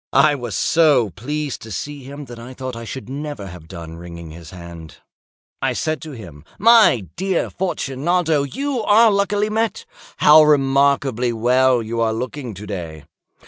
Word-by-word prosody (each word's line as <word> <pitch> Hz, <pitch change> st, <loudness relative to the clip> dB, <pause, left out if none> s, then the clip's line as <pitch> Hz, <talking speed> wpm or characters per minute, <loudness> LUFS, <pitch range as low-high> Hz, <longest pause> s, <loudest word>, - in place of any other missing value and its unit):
I 145 Hz, +2 st, +6 dB
was 120 Hz, -7 st, -5 dB
so 145 Hz, -, +3 dB
pleased 145 Hz, -, -4 dB
to 110 Hz, -, -10 dB
see 145 Hz, -, -5 dB
him, 140 Hz, +2 st, -9 dB
that 120 Hz, -2 st, -10 dB
I 125 Hz, +2 st, -10 dB
thought 130 Hz, -1 st, -6 dB
I 115 Hz, 0 st, -7 dB
should 115 Hz, -1 st, -7 dB
never 145 Hz, -4 st, -6 dB
have 90 Hz, -4 st, -11 dB
done 85 Hz, -2 st, -9 dB
wringing 85 Hz, -1 st, -9 dB
his 80 Hz, 0 st, -11 dB
hand. 85 Hz, -3 st, -11 dB, 0.6 s
I -, -, 0 dB
said 155 Hz, -3 st, -2 dB
to 155 Hz, -1 st, -8 dB
him—"My 115 Hz, -, +3 dB
dear 190 Hz, -1 st, -1 dB
Fortunato, 165 Hz, -2 st, 0 dB
you 265 Hz, -, -3 dB
are 220 Hz, +1 st, +5 dB
luckily 205 Hz, +1 st, 0 dB
met. 225 Hz, +1 st, -1 dB, 0.3 s
How 150 Hz, +1 st, +7 dB
remarkably 135 Hz, -4 st, +2 dB
well 125 Hz, +1 st, +2 dB
you 115 Hz, +1 st, -3 dB
are 110 Hz, -1 st, +1 dB
looking 125 Hz, 0 st, -5 dB
to 100 Hz, +3 st, -9 dB
day! 85 Hz, -7 st, -6 dB
130 Hz, 160 wpm, -20 LUFS, 105-155 Hz, 0.6 s, How